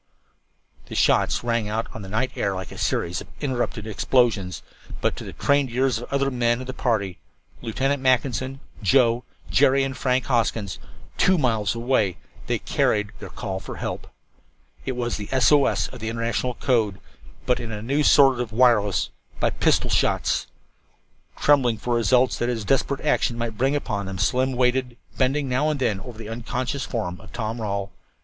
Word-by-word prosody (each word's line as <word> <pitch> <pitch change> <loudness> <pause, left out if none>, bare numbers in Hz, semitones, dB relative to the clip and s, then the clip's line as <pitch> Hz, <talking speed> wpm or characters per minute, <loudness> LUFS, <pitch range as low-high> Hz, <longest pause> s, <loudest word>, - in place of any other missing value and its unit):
The - - -7
shots - - +3
rang 115 -3 0
out 110 +2 -1
on 110 - -7
the 95 - -8
night 110 +6 0
air 100 -1 -1
like 95 -1 -6
a - - -9
series 85 +1 -1
of - - -11
interrupted 125 -5 -2
explosions. 110 -3 +1 0.4
But - - 0
to - - -6
the - - -7
trained 140 -2 +2
ears 125 0 +1
of 120 - -9
the - - -2
other 140 0 +1
men 120 -1 +1
of 130 - -6
the 130 - -5
party 105 -8 -1 0.4
Lieutenant 135 +4 -1
Mackinson, 130 +1 +1 0.2
Joe, 120 +3 +3 0.3
Jerry 135 0 +4
and 135 -1 -3
Frank 130 -1 0
Hoskins 115 -6 0 0.4
two 185 0 +4
miles 115 - +1
away, 115 -6 +1 0.3
they - - +1
carried 105 -1 0
their - - -8
call 95 0 -4
for - - -8
help. - - -5 0.8
It 130 - 0
was 120 -1 -2
the 105 -1 -7
S 130 +1 +4
O 145 -2 +5
S - - 0
of - - -10
the 110 0 -3
international 115 +2 -1
code, 110 -6 +1 0.5
but 125 0 +1
in 115 -2 -5
a 105 -1 -5
new 140 +6 +1
sort 135 -3 +6
of 120 -2 -3
wireless 110 -4 +3 0.3
by - - +2
pistol - - +2
shots! - - +1 0.9
Trembling 130 -6 +3
for 120 +3 -2
the - - +3
results 125 +2 +3
that 120 - 0
his 115 -4 -2
desperate 135 +3 +1
action 135 -5 +1
might 115 -2 -3
bring 135 +6 +1
upon 105 -8 -2
them, 95 0 -5
Slim 130 +7 +1
waited, 125 0 +1 0.2
bending 135 +2 +2
now 135 +4 +1
and 150 -2 -1
then 105 -7 0
over 110 +3 -10
the 110 -2 -8
unconscious 125 +3 -3
form 90 -7 -4
of - - -14
Tom 115 0 -4
Rawle. 100 -2 -2
120 Hz, 185 wpm, -24 LUFS, 110-130 Hz, 0.9 s, sort